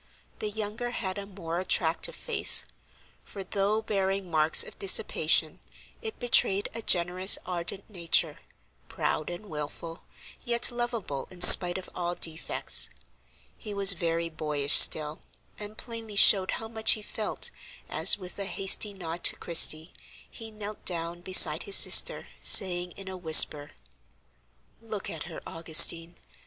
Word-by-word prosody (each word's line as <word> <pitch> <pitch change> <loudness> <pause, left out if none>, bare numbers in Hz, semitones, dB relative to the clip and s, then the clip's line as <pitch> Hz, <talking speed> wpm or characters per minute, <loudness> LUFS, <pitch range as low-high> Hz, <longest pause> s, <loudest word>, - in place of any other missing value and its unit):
The 215 - -6
younger 215 +3 -8
had 195 -5 -8
a 200 - -11
more 175 -4 -9
attractive 175 -2 -4
face, - - +1 0.6
for, 195 - -12
though 205 +3 -5
bearing 195 -3 -5
marks 155 0 +3
of - - -15
dissipation, 395 - 0 0.4
it 445 -2 -9
betrayed 205 -5 -1
a 230 - -8
generous, 180 0 +2
ardent 180 +2 -8
nature, 175 -6 -3 0.5
proud 155 - -6
and 175 +4 -11
wilful, 160 0 -10 0.4
yet 240 0 0
lovable 235 - -7
in 180 - -17
spite 180 0 +9
of 190 - -11
all 175 0 -6
defects. 155 - -2 0.7
He 210 -1 -11
was 200 -1 +3
very 170 -1 -5
boyish 150 -3 -3
still, 150 0 +4 0.4
and 210 +1 -11
plainly 230 -3 -11
showed 195 -1 +3
how 225 - -10
much 220 -1 +2
he 215 - -7
felt, 215 0 -6 0.4
as, - - +2
with 185 0 -11
a 200 - -5
hasty 195 +1 0
nod 170 -2 -10
to - - +2
Christie, 160 -1 +2 0.3
he 225 -1 -13
knelt 215 -1 -12
down 170 -1 -5
beside 170 -3 +4
his 195 - +4
sister, - - +5 0.2
saying, 180 -2 +3
in 195 -1 -13
a 190 - -9
whisper: 155 -4 +3 1.1
"Look 220 -3 -9
at 160 -2 -10
her, 170 -1 -13
Augustine! 165 +1 +2
185 Hz, 140 wpm, -24 LUFS, 165-210 Hz, 1.1 s, spite